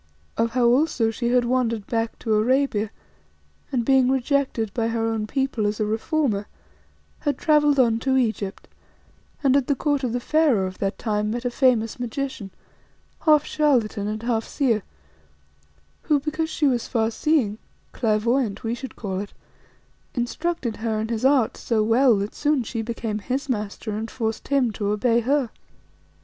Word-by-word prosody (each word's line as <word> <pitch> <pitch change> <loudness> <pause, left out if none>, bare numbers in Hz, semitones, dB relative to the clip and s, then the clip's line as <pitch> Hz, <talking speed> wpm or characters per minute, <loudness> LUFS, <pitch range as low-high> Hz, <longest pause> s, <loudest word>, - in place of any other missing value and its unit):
Of 230 0 0
how 250 -1 +2
also 240 -2 +3
she 235 +2 -3
had 245 0 +3
wandered 235 -4 0
back 225 -1 -2
to 220 - -1
Arabia 220 -1 +2 0.8
and, 245 -4 0
being 265 -1 +4
rejected 265 -5 0
by 230 -2 0
her 230 0 -1
own 225 -1 -1
people 265 -4 -1
as 210 +1 -2
a 215 - +1
reformer, 220 -1 -1 0.7
had 290 -2 -1
travelled 295 -2 +3
on 230 -3 +3
to 265 +2 +1
Egypt, 220 -5 -2 0.8
and 270 -1 +4
at 280 -3 +2
the 285 - +2
court 285 0 0
of 250 - 0
the 245 - -1
Pharaoh 275 -7 +2
of 185 0 -7
that 195 0 -1
time 210 -2 -1
met 240 +3 -3
a 245 - 0
famous 240 -3 +2
magician, 245 -3 -4 0.8
half 300 -1 +6
charlatan 245 -9 +1
and 215 +1 -4
half 230 -2 0
seer 235 -6 0 1.2
who, 295 -2 +2
because 310 +2 -2
she 315 - 0
was 250 -4 +1
far 225 -2 0
seeing, 230 -5 +1 0.3
'clairvoyante' 225 0 0
we 225 0 -1
should 260 +2 -7
call 190 -4 -4
it, 200 0 -6 0.8
instructed 245 0 -2
her 220 0 -1
in 220 +1 -3
his 230 0 -2
art 265 -4 +3
so 220 -2 0
well 235 +2 +4
that 200 +1 -3
soon 295 -3 +1
she 230 0 -4
became 225 -2 -3
his 260 +7 -3
master 215 -2 -3
and 220 +2 -4
forced 225 -3 -3
him 270 -5 +2
to 205 -1 -3
obey 230 +3 +2
her. 260 0 0
235 Hz, 165 wpm, -23 LUFS, 220-270 Hz, 1.2 s, half